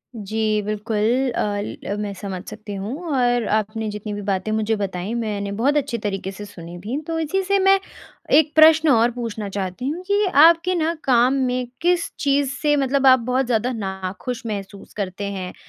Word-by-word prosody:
जी, 215 Hz, +1 st, -5 dB, 0.3 s
बिल्कुल 220 Hz, +4 st, 0 dB
अ, -, -, 0 dB, 0.4 s
ल 200 Hz, -, -3 dB
मैं 205 Hz, -1 st, -3 dB
समझ 190 Hz, -2 st, -6 dB
सकती 215 Hz, -1 st, -8 dB
हूँ 200 Hz, +5 st, -4 dB, 0.2 s
और 245 Hz, -3 st, +2 dB
आपने 215 Hz, +1 st, -1 dB
जितनी 210 Hz, 0 st, -6 dB
भी 205 Hz, -, -5 dB
बातें 195 Hz, +2 st, -1 dB
मुझे 220 Hz, 0 st, 0 dB
बताई 195 Hz, +1 st, -3 dB
मैंने 210 Hz, -4 st, -3 dB
बहुत 260 Hz, +9 st, +1 dB
अच्छी 245 Hz, -4 st, -1 dB
तरीक़े 195 Hz, -3 st, -3 dB
से 205 Hz, +1 st, -8 dB
सुनी 175 Hz, -3 st, -10 dB
भी। 220 Hz, +9 st, -4 dB
तो 325 Hz, -1 st, -2 dB
इसी 325 Hz, +5 st, 0 dB
से 395 Hz, +2 st, +2 dB
मैं 390 Hz, 0 st, +5 dB, 0.6 s
एक 305 Hz, -1 st, +1 dB
प्रश्न 315 Hz, 0 st, +7 dB
और 235 Hz, -1 st, +4 dB
पूछना 225 Hz, -4 st, -5 dB
चाहती 195 Hz, +5 st, -4 dB
हूँ 350 Hz, +4 st, -4 dB
कि 410 Hz, +1 st, +2 dB
आपके 335 Hz, +2 st, +5 dB
ना 330 Hz, 0 st, +1 dB
काम 250 Hz, 0 st, +4 dB, 0.2 s
में 250 Hz, -1 st, -2 dB
किस 350 Hz, 0 st, +2 dB
चीज़ 280 Hz, -1 st, +1 dB
से 295 Hz, -1 st, +3 dB
मतलब 275 Hz, 0 st, +2 dB
आप 260 Hz, 0 st, +7 dB
बहुत 250 Hz, +3 st, 0 dB
ज़्यादा 240 Hz, +1 st, 0 dB
नाख़ुश 195 Hz, +4 st, -5 dB
महसूस 200 Hz, -2 st, -6 dB
करते 195 Hz, -1 st, -4 dB
हैं? 185 Hz, -2 st, -5 dB
230 Hz, 185 wpm, -22 LUFS, 205-275 Hz, 0.6 s, प्रश्न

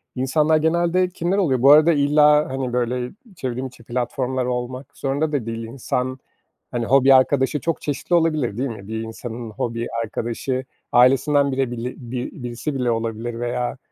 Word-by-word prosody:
insanlar 150 Hz, +5 st, +2 dB
genelde 170 Hz, +3 st, +2 dB
kimler 180 Hz, +1 st, -1 dB
oluyor? 140 Hz, -11 st, +1 dB
Bu 135 Hz, +2 st, +7 dB
arada 155 Hz, +3 st, +7 dB
illa, 150 Hz, 0 st, +4 dB
hani, 130 Hz, -2 st, -3 dB
böyle 125 Hz, 0 st, -1 dB, 0.2 s
çevrim 130 Hz, -4 st, -3 dB
içi 125 Hz, -2 st, -16 dB
platformlar 125 Hz, +2 st, -2 dB
olmak 125 Hz, +2 st, -4 dB
zorunda 145 Hz, +3 st, -1 dB
da 140 Hz, -7 st, -1 dB
değil. 115 Hz, 0 st, -4 dB
İnsan, 125 Hz, +2 st, -3 dB, 0.5 s
hani, 120 Hz, -1 st, -2 dB
hobi 135 Hz, +2 st, +5 dB
arkadaşı 135 Hz, +2 st, +3 dB
çok 165 Hz, +4 st, -2 dB
çeşitli 150 Hz, +4 st, -1 dB
olabilir, 155 Hz, -10 st, +1 dB
değil 135 Hz, +2 st, -1 dB
mi? 100 Hz, -4 st, -9 dB
Bir 110 Hz, +1 st, -4 dB
insanın 115 Hz, +1 st, -7 dB
hobi 115 Hz, +2 st, -3 dB, 0.2 s
arkadaşı 120 Hz, +4 st, -3 dB, 0.3 s
ailesinden 135 Hz, +3 st, +4 dB
bile 130 Hz, -2 st, -1 dB
bili 120 Hz, +1 st, -4 dB
bi 125 Hz, 0 st, -5 dB
birisi 120 Hz, +5 st, -4 dB
bile 125 Hz, -2 st, 0 dB
olabilir 115 Hz, +1 st, -3 dB
veya 120 Hz, +1 st, -2 dB
130 Hz, 160 wpm, -22 LUFS, 120-145 Hz, 0.5 s, Bu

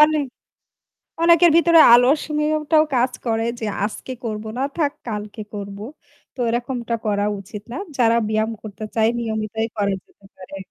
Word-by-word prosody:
অনেক 300 Hz, -1 st, +5 dB, 1.0 s
অনেকের 340 Hz, 0 st, +6 dB
ভিতরে 335 Hz, -1 st, +5 dB
আলসেমিটাও 300 Hz, +4 st, +2 dB, 0.2 s
কাজ 250 Hz, +1 st, +2 dB
করে 225 Hz, -1 st, 0 dB
যে 220 Hz, -, -4 dB, 0.2 s
আজকে 220 Hz, +4 st, -6 dB
করব 215 Hz, -1 st, -4 dB
না 260 Hz, -, 0 dB
থাক 295 Hz, -4 st, +1 dB, 0.2 s
কালকে 210 Hz, -1 st, -5 dB
করব। 200 Hz, -1 st, -6 dB, 0.6 s
তো -, -, -16 dB
এরকমটা 240 Hz, 0 st, -2 dB
করা 205 Hz, -1 st, 0 dB
উচিত 200 Hz, +1 st, -9 dB
না। -, -, -5 dB, 0.2 s
যারা 230 Hz, -2 st, +4 dB
ব্যায়াম 220 Hz, +1 st, 0 dB
করতে 215 Hz, 0 st, -8 dB
চায় 220 Hz, 0 st, +3 dB
নিয়মিতই 220 Hz, 0 st, -2 dB
করা 200 Hz, -1 st, +1 dB
যেতে 200 Hz, -, -25 dB
পারে। 190 Hz, +1 st, -10 dB
230 Hz, 145 wpm, -21 LUFS, 215-285 Hz, 1.0 s, অনেকের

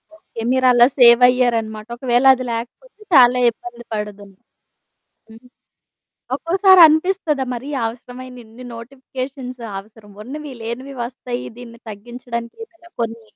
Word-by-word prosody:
Okay. 230 Hz, -, -11 dB
మీరలా 255 Hz, -2 st, +5 dB
save 235 Hz, 0 st, +7 dB
అయ్యారనమాట. 230 Hz, -3 st, -1 dB
ఒకవేళ 245 Hz, 0 st, +1 dB
అది 255 Hz, -, -6 dB
లేకపోతే 245 Hz, -, -8 dB, 0.2 s
చాలా 250 Hz, -1 st, +6 dB
ఇబ్బంది 240 Hz, +1 st, -11 dB
పడుదును. 205 Hz, -2 st, -7 dB, 1.0 s
హ్మ్. 230 Hz, +3 st, -16 dB, 0.9 s
ఒక్కోసారి 375 Hz, +2 st, +4 dB
అనిపిస్తదా? 315 Hz, -3 st, 0 dB
మరి 250 Hz, +4 st, -7 dB, 0.2 s
అవసరమైన 250 Hz, +2 st, -9 dB
ఇన్ని 225 Hz, +3 st, -14 dB
నోటిఫికేషన్స్ 255 Hz, +1 st, -8 dB, 0.2 s
అవసరం. 210 Hz, +1 st, -15 dB
ఉన్నవి 290 Hz, +5 st, -8 dB
లేనివి 255 Hz, +5 st, -6 dB
వస్తాయి 245 Hz, 0 st, -6 dB
దీన్ని 235 Hz, -1 st, -12 dB
తగ్గించడానికి 235 Hz, -, -8 dB
ఏమైనా 345 Hz, -5 st, -22 dB
కొన్ని 230 Hz, 0 st, -5 dB
245 Hz, 110 wpm, -19 LUFS, 230-265 Hz, 1.0 s, save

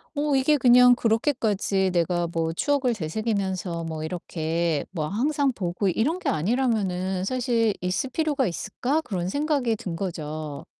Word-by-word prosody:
어 290 Hz, -1 st, +1 dB
이게 290 Hz, +3 st, +3 dB
그냥 250 Hz, -1 st, +7 dB
그렇게까지 220 Hz, -6 st, +1 dB
내가 175 Hz, 0 st, +1 dB
뭐 165 Hz, -1 st, -1 dB
추억을 265 Hz, -, +1 dB
되새기면서 190 Hz, -2 st, -2 dB
뭐 160 Hz, -1 st, -5 dB
이렇게 165 Hz, -2 st, -2 dB
뭐 155 Hz, -4 st, -2 dB
항상 275 Hz, -, +1 dB
보고 180 Hz, +1 st, -2 dB
이런 275 Hz, -, 0 dB
게 -, -, -1 dB
아니라면은 190 Hz, -, 0 dB
사실 235 Hz, -2 st, +1 dB
있을 185 Hz, +8 st, -1 dB
필요가 290 Hz, -5 st, 0 dB
있을까?' 245 Hz, -, -2 dB
그런 180 Hz, -3 st, -3 dB
생각이 285 Hz, -4 st, 0 dB
든 175 Hz, -5 st, -5 dB
거죠. 155 Hz, -5 st, -5 dB
200 Hz, 310 characters per minute, -25 LUFS, 170-250 Hz, -, 그냥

